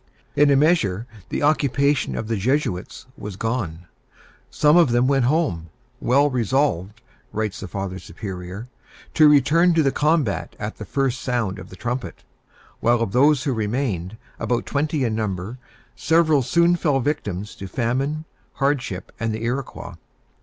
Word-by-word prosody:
In 145 0 +5
a 140 - +5
measure, 135 - +2 0.2
the - - -2
occupation 145 -1 +2
of 110 - -4
the 115 - 0
Jesuits 105 -3 -1
was 105 -8 -7
gone. 95 -7 -3 0.6
Some 150 +1 +3
of 170 -5 +6
them 120 +1 +3
went 135 -2 +2
home, 130 - 0 0.3
"well 140 +4 +3
resolved," 115 - 0 0.3
writes 110 -2 -3
the 100 - -6
Father 95 0 -4
Superior, 95 +4 -7 0.5
"to 155 -2 +6
return 165 +5 +4
to 160 - +4
the 135 - +2
combat 150 -8 0
at - - -5
the - - -7
first 135 -2 -1
sound 115 -6 -1
of - - -10
the - - -11
trumpet;" 125 +1 -4 0.6
while 120 0 +3
of 115 -4 -1
those 140 +3 +4
who 140 -4 0
remained, 110 -4 -2 0.2
about 120 -1 -1
twenty 150 0 -1
in 115 -3 0
number, 105 +2 -3 0.4
several 160 -2 +3
soon 170 +7 +3
fell 150 -5 +1
victims 105 - -3
to 95 - -8
famine, 135 - -1 0.3
hardship, 130 -10 -1
and 115 -1 -1
the 110 - -6
Iroquois. 125 +4 -4
125 Hz, 155 wpm, -22 LUFS, 105-145 Hz, 0.6 s, of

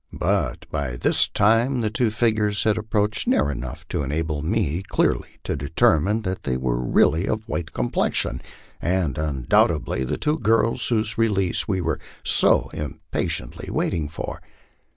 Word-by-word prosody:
But - - -1
by 70 -5 -2
this - - +2
time 115 +5 +2
the 110 -2 0
two 120 0 +1
figures 110 -2 +1
had 110 -1 +3
approached 105 -2 -1
near 75 0 +2
enough 65 -2 -7
to - - -1
enable 75 +2 -2
me 85 -1 0
clearly - - 0
to - - -2
determine 80 +8 +2
that 95 -1 -3
they 65 -2 -1
were 60 -1 -1
really 80 +8 +3
of 110 +1 -2
white 85 -7 -3
complexion, - - 0 0.4
and 85 -6 0
undoubtedly 65 -2 +1
the 65 - -2
two 150 +1 0
girls 115 +1 +2
whose 110 -1 0
release 100 -5 +1
we 95 -3 0
were 80 -3 -1 0.2
so - - +3
impatiently 75 -3 -4
waiting 75 -3 -1
for. 80 - -6
95 Hz, 150 wpm, -23 LUFS, 75-110 Hz, 0.4 s, had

